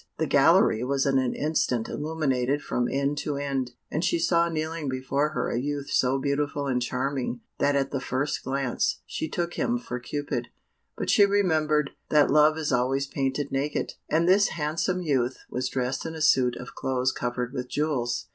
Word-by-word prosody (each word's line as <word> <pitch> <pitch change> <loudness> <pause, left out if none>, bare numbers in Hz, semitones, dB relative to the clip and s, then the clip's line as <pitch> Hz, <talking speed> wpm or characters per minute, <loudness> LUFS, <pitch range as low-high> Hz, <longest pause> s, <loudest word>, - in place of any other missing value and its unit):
The - - 0
gallery 110 - +4
was 135 +1 0
in 135 -1 +3
an 130 -2 -1
instant 150 -6 0
illuminated 145 -3 -1
from 120 0 -1
end 140 +1 0
to 150 - -2
end, 135 -3 -2 0.2
and 155 - -1
she 170 - +2
saw 170 0 +2
kneeling 160 -2 -3
before 130 +3 0
her - - -1
a 120 - 0
youth 145 +1 -3
so 130 +1 +2
beautiful 140 +1 -1
and 125 -2 0
charming, 125 -1 -2 0.2
that 145 - +2
at 135 -1 0
the 135 - -1
first 135 +3 -2
glance 135 -2 -1
she 160 - -4
took 175 0 -2
him 240 - +1
for 235 - -5
Cupid, 125 -2 -3 0.5
but - - 0
she 205 - +6
remembered 155 -7 +2 0.2
that 150 -2 +4
Love 155 +1 +5
is 155 -2 -2
always 130 +3 +1
painted 140 0 -2
naked, 140 +2 -1 0.2
and 165 +2 +2
this 200 +2 +5
handsome 165 +4 -1
youth 130 -5 0
was 125 0 -2
dressed 130 0 -2
in 160 0 -5
a 160 - -6
suit 130 -5 +4
of 125 - -9
clothes 130 0 0
covered 125 0 -3
with 125 -2 -4
jewels. 135 -5 -1
140 Hz, 185 wpm, -26 LUFS, 130-155 Hz, 0.5 s, she